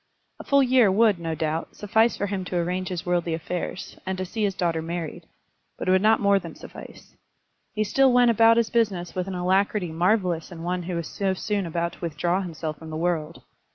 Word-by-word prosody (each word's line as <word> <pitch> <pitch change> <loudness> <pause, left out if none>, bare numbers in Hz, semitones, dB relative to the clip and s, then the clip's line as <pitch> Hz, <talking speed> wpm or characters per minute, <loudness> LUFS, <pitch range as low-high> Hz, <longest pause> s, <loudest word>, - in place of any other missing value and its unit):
A - - -7
full 280 -1 +4
year 250 -5 +4
would, 210 -2 +3
no 165 -1 -3
doubt, 160 +1 -3
suffice 220 +3 +2
for 200 - -1
him 195 -2 -3
to 180 - -5
arrange 180 +2 -1
his 180 -2 -4
worldly 175 -2 0
affairs, 175 +3 -5
and 190 0 -3
to 185 - -3
see 220 +5 -5
his 195 -2 0
daughter 170 -4 0
married; 165 -1 -5 0.5
but - - -5
it - - +4
would 185 0 +4
not 220 +2 +4
more 200 -1 +3
than - - -9
suffice. - - -12 0.6
He 215 - +1
still 265 +6 +3
went 245 -1 +5
about 230 +1 +5
his 230 -1 +1
business 200 -7 0
with 185 0 -3
an 190 - -4
alacrity 185 0 +1
marvellous 175 -1 0
in 165 -1 -8
one 180 +1 -2
who 175 +1 -4
was 170 -2 -3
so 195 -1 -1
soon 200 -1 -2
about 170 +1 -2
to - - -15
withdraw 170 +3 -1
himself 160 -4 -5
from 160 - -10
the 155 - -5
world. 165 -1 -2
185 Hz, 220 wpm, -25 LUFS, 170-205 Hz, 0.6 s, went